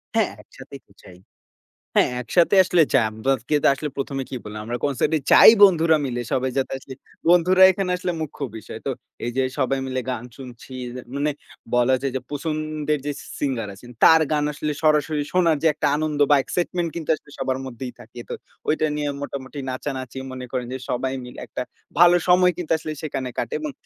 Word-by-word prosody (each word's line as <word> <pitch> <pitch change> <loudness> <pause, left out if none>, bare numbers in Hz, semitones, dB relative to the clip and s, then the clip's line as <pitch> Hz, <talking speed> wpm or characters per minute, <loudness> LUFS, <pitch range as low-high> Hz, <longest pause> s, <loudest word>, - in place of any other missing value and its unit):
হ্যাঁ - - +2
একসাথেই - - -13
তো - - -27
যাই। 90 -1 -14 0.8
হ্যাঁ - - +4
একসাথে 170 +10 +3
আসলে 175 -2 +3
যাই। 120 -5 +4
আমরা 110 +5 -1 0.4
আসলে 150 +2 -4
প্রথমে 135 -1 -3
কি 135 - -5
বললাম 105 0 -7
আমরা 120 +1 -3
কনসার্ট 140 -3 0
এ - - -3
যাই - - +10
বন্ধুরা 165 -4 +5
মিলে 120 -2 -3
সবাই 130 0 0
যাতে 135 - 0
আসলে 130 - -10 0.4
বন্ধুরা 180 +2 +5
এখানে 185 -1 -2
আসলে 180 - -2
মুখ্য 155 - -6 0.2
বিষয়। 105 - -9
তো - - 0 0.3
এই 120 - -2
যে 130 - +3 0.2
সবাই 135 +1 +1
মিলে 130 0 -2
গান 120 -2 -4
শুনছি, 130 0 -11 0.4
মানে 145 +1 0 0.4
বলা 125 +2 +4
যায় 135 - -1
যে 130 - -1
পছন্দের 155 0 -2
যে 145 - -1 0.3
সিঙ্গার 125 -7 -1
আছেন 120 +5 -14
তার 160 0 +8
গান 150 -1 +2
আসলে 150 +1 -3
সরাসরি 150 -1 +2
শোনার 170 -4 +3
যে - - +5
একটা 150 0 0
আনন্দ 155 -1 -2
বা - - +8
excitement 175 -1 -2
কিন্তু 165 -2 -6
আসলে 145 - -19
সবার 130 0 -1
মধ্যেই 125 0 -7
থাকে। 115 +2 -12
তো - - -3 0.3
ঐটা 155 0 +2 0.4
মোটামুটি 140 0 -6
নাচানাচি 130 0 -5
মনে 130 -1 -6
করেন 125 -2 -3
যে - - -3
সবাই 130 +2 -1
মিলে 125 - -10
একটা - - -5 0.4
ভালো 175 0 +8
সময় 180 0 +5
কিন্তু 175 -3 -5
আসলে 155 0 -6
সেখানে 135 -4 -3
কাটে 115 - -2
এবং 150 -2 -4
140 Hz, 185 wpm, -23 LUFS, 130-155 Hz, 0.8 s, যাই